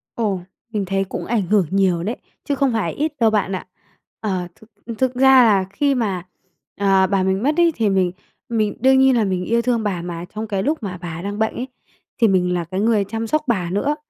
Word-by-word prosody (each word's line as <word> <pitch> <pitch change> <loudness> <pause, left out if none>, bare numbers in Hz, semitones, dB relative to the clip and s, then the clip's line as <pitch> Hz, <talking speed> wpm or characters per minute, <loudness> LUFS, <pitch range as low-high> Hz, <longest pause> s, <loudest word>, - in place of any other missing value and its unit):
Ồ, 205 -5 -1 0.3
mình 205 -3 -1
thấy 195 +1 0
cũng 190 - -6
ảnh 220 -5 0
hưởng 205 -3 +3
nhiều 185 -3 +1
đấy, 225 +5 -2 0.3
chứ 285 - -1
không 270 -3 +1
phải 200 -8 -1
ít 305 +1 -2
đâu 225 -1 +5
bạn 205 -3 0
ạ. 185 - -7 0.5
Ờ, 185 -4 -2
thực 220 - -20 0.3
thực 260 -1 0
ra 265 -1 +6
là 200 -4 +3
khi 280 +5 +1
mà, 195 -7 -2 0.5
ờ, 195 -1 +4
bà 195 -1 +1
mình 190 +3 0
mất 300 +4 +1
ấy, 340 -2 +4
thì 220 -3 +1
mình 185 -2 +2 0.4
mình 215 -3 0
đương 265 0 +5
nhiên 265 -1 +5
là 220 - +3
mình 185 -2 -1
yêu 235 +1 +1
thương 235 -2 0
bà, 185 -5 -2
mà 175 0 -6
trong 220 +1 -4
cái 195 -2 -2
lúc 300 -4 -1
mà 180 -2 -4
bà 170 -1 -6
đang 205 +2 -5
bệnh 220 - +1
ấy, 255 +2 -4 0.5
thì 225 - +6
mình 180 -2 +2
là 175 -1 -1
cái 185 +4 -4
người 215 -1 +2
chăm 225 +3 -4
sóc 310 +4 +1
bà 185 -7 0
nữa, 270 +11 0
205 Hz, 235 wpm, -20 LUFS, 190-235 Hz, 0.5 s, ra